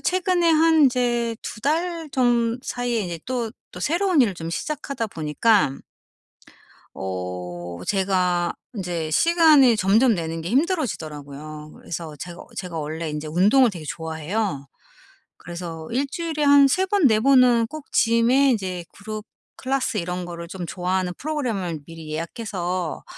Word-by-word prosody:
최근에 365 -2 +1
한 320 -1 +5
이제 240 -2 0
2 - - -7
달 330 +4 -1
좀 240 -2 +2
사이에 245 -3 -2
이제 170 -3 -5
또, 240 -3 -2 0.2
또 180 - -9
새로운 340 - +3
일을 220 -5 +1
좀 165 -1 -6
시작하다 275 - -3
보니까 155 -1 +1 1.2
어 90 -2 -5
제가 185 -3 +1 0.2
인제 175 -5 -3
시간이 310 - +5
점점 215 +5 +4
내는 165 -1 -4
게 165 - -5
힘들어지더라고요. 155 - -2
그래서 160 -2 -6
제가 175 +3 -8
제가 180 -3 -5
원래 155 +2 -4
인제 150 0 -5
운동을 210 - +4
되게 170 -6 -8
좋아해요. 160 -1 -3 0.7
그래서 170 -2 -7
일주일에 300 +5 -2
한 285 -1 +7
3 370 +8 +1
번, 385 -5 +3
4 215 -3 +4
번은 250 -2 +5
꼭 310 +1 -9
짐에 240 +4 +4
인제 185 -7 -2
그룹 215 +1 -7 0.3
클래스 260 -3 -1
이런 180 0 -3
거를 170 -1 -7
좀 185 0 -6
좋아하는 180 +1 -1
프로그램을 225 - -2
미리 165 -2 -10
예약해서 175 0 -3
205 Hz, 285 characters per minute, -23 LUFS, 165-265 Hz, 1.2 s, 한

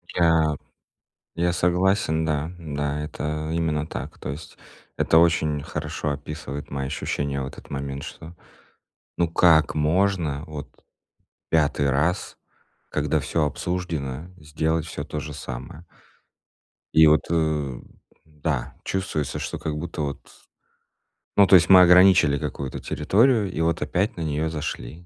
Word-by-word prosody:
Я 80 -3 +3 0.8
я 85 +1 +1
согласен, 90 -2 +1
да. 75 +1 -1
Да, 75 -2 -3
это 75 +1 -4
именно 80 -2 -1
так. - - -7
То - - -6
есть 75 +3 -8 0.4
это 80 - +3
очень 80 -3 +3
хорошо 75 - -3
описывает 70 0 -6
мои 70 -1 -3
ощущения 70 -1 -2
в 65 - -3
этот - - -12
момент, 70 0 -4
что, 80 +4 -10 0.8
ну, 85 - +2
как 80 -2 +4
можно 80 -1 +1
вот 75 -2 -7 0.8
5 75 -3 +2
раз, 75 +7 0 0.5
когда - - 0
всё 80 -3 0
обсуждено, 80 -3 -3
сделать 80 +1 -1
всё 75 - -5
то 75 +1 -5
же 75 +1 -7
самое? 65 +4 -8 1.1
И 80 0 +7
вот, 75 +1 +4
э, 75 -6 0 0.5
да, 75 -3 -3
чувствуется, 95 -7 -2
что - - -4
как 75 - -4
будто 85 0 -5
вот 70 -2 -3 1.2
Ну, 100 - +7
то 95 - +7
есть 85 +1 +5
мы 95 -1 +9
ограничили 90 -5 +6
какую-то 65 -1 -5
территорию- 110 -2 +2
и 90 - -5
вот 85 -1 0
опять 95 +10 0
на - - -4
неё 80 +1 -1
зашли. 80 +1 -6
80 Hz, 135 wpm, -24 LUFS, 75-85 Hz, 1.2 s, мы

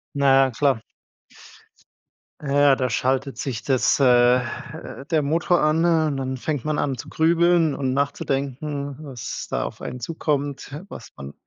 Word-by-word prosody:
Na, 135 -1 +5
ja 130 - -2
klar. 130 -2 +1 1.6
Ja, 140 -1 +4
da 130 -2 -1
schaltet 135 +3 -1
sich 125 -5 -4
das, 135 +1 +2
äh, - - +3 0.4
äh 125 +2 -8
der 155 -2 +3
Motor 165 +4 +1
an 155 +2 +2
und 160 -4 +2
dann 130 -1 -3
fängt 145 0 -3
man 155 -1 0
an 135 -3 -1
zu - - -8
grübeln 165 -1 +3
und 130 -2 -1
nachzudenken, 140 0 -2
was 135 -7 -6
da - - -1
auf - - -7
einen 125 - -6
zukommt, 145 0 -3
was - - -10
man 70 +1 -9
140 Hz, 150 wpm, -23 LUFS, 130-155 Hz, 1.6 s, Na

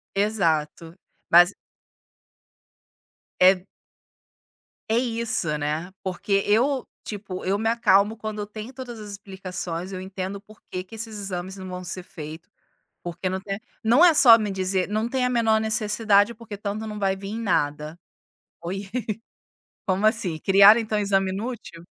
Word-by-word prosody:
Exato, 165 -6 0 0.4
mas 175 +3 +7 1.9
É. 185 0 +5 1.2
É 225 - +2
isso, 230 -10 -1
né, 155 +5 -3
porque 195 +2 0
eu, 250 +6 +2 0.2
tipo, 195 -4 -6
eu 195 +2 +1
me 225 +2 0
acalmo 215 -2 +3
quando 215 -1 -5
eu 205 - -4
tenho 215 +4 -8
todas 245 -3 -8
as 210 -1 -8
explicações, 190 -3 -6
eu 185 - -5
entendo 190 +1 -5
porque 200 -3 -9
que 190 +4 -13
esses 220 -1 -5
exames 190 -1 -4
não 190 -1 -8
vão 180 0 -6
ser 185 +1 -5
feito, 160 -2 -10 0.5
porque 175 +2 -3
não 190 - -2
tem, 195 +1 -5 0.2
não 240 +8 +5
é 350 -2 +7
só 235 -6 +8
me 215 -2 -2
dizer 190 -1 -1
não 215 +2 0
tem 255 +1 -1
a 250 - +2
menor 225 -3 +2
necessidade 215 -1 +2
porque 220 -2 -9
tanto 210 +2 -4
não 210 - -6
vai 195 -1 +1
vim 195 +2 -6
em - - -4
nada. 155 -5 -1 0.6
Oi, 195 +3 -5 1.0
como 190 +2 +1
assim, 215 -7 +1
criaram 200 +6 +7
então 215 -1 -1
exame 195 -2 +1
inútil? 205 -5 -6
200 Hz, 150 wpm, -24 LUFS, 185-220 Hz, 1.9 s, só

